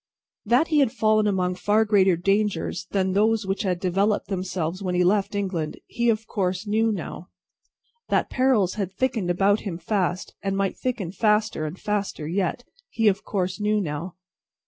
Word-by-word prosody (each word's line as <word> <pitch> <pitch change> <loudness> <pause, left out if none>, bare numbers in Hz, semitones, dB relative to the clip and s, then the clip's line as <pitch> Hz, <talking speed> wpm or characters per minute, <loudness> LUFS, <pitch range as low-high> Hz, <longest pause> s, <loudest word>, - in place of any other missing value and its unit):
That 245 +9 +3
he 305 -2 +3
had 270 -5 +3
fallen 215 -1 +2
among 185 -2 +1
far 210 +4 +2
greater 195 -4 +4
dangers 195 -1 0
than 190 -1 0
those 215 +1 +2
which 195 +1 -1
had 185 -4 -1
developed 195 +3 0
themselves 185 -2 -3
when 180 -2 -2
he 180 - +3
left 200 +2 +1
England, 185 -6 -2
he 235 0 0
of 220 0 0
course 185 -1 -2
knew 220 +2 +2
now. 180 -3 -6 0.8
That - - +2
perils 250 -8 +2
had 190 -1 -3
thickened 225 -3 -1
about 195 +4 +3
him 185 -5 -5
fast, 180 0 -2
and 195 0 -1
might 195 -1 0
thicken 235 -9 -3
faster 210 -5 +1
and 165 +5 -8
faster 205 -7 -2
yet, 185 +7 -1 0.3
he 225 -1 +1
of 195 0 -2
course 185 -1 -2
knew 210 0 +1
now. 170 0 -4
195 Hz, 170 wpm, -24 LUFS, 180-215 Hz, 0.8 s, greater